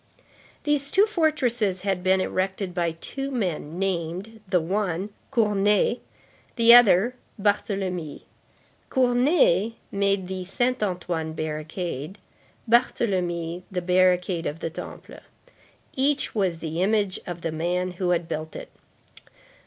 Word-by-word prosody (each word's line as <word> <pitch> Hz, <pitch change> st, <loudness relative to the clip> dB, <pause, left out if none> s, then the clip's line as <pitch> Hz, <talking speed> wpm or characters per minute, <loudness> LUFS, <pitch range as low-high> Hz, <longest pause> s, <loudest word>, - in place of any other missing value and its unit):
These 290 Hz, -2 st, +1 dB
two 395 Hz, +5 st, +5 dB
fortresses 250 Hz, -, 0 dB
had 195 Hz, -2 st, -1 dB
been 190 Hz, 0 st, +3 dB
erected 190 Hz, 0 st, -2 dB
by 170 Hz, -2 st, 0 dB
two 270 Hz, +11 st, -5 dB
men 180 Hz, -, -3 dB
named, 190 Hz, +3 st, -3 dB
the 180 Hz, -1 st, +2 dB
one, 190 Hz, +2 st, -2 dB, 0.2 s
Cournet, 210 Hz, -1 st, +2 dB, 0.6 s
the 235 Hz, -1 st, +7 dB
other, 235 Hz, -1 st, +6 dB, 0.3 s
Barthélemy. 195 Hz, -5 st, -1 dB, 0.7 s
Cournet 245 Hz, -, +3 dB, 0.2 s
made 200 Hz, -1 st, +1 dB
the 185 Hz, 0 st, -4 dB
Saint 245 Hz, +6 st, 0 dB
Antoine 175 Hz, -5 st, -2 dB
barricade; 155 Hz, +2 st, -4 dB, 0.5 s
Barthélemy 180 Hz, -8 st, +1 dB
the 180 Hz, -2 st, -3 dB
barricade 180 Hz, -1 st, +2 dB
of 150 Hz, +3 st, -5 dB
the 165 Hz, -, -4 dB
Temple. -, -, -9 dB, 0.8 s
Each 280 Hz, +1 st, +1 dB
was 190 Hz, -6 st, 0 dB
the 160 Hz, +1 st, -3 dB
image 200 Hz, -1 st, +1 dB
of 175 Hz, -1 st, -6 dB
the 165 Hz, -, -2 dB
man 175 Hz, +3 st, -1 dB
who 180 Hz, 0 st, -2 dB
had 175 Hz, -1 st, +1 dB
built 155 Hz, 0 st, -5 dB
it. -, -, -8 dB
190 Hz, 120 wpm, -25 LUFS, 175-225 Hz, 0.8 s, the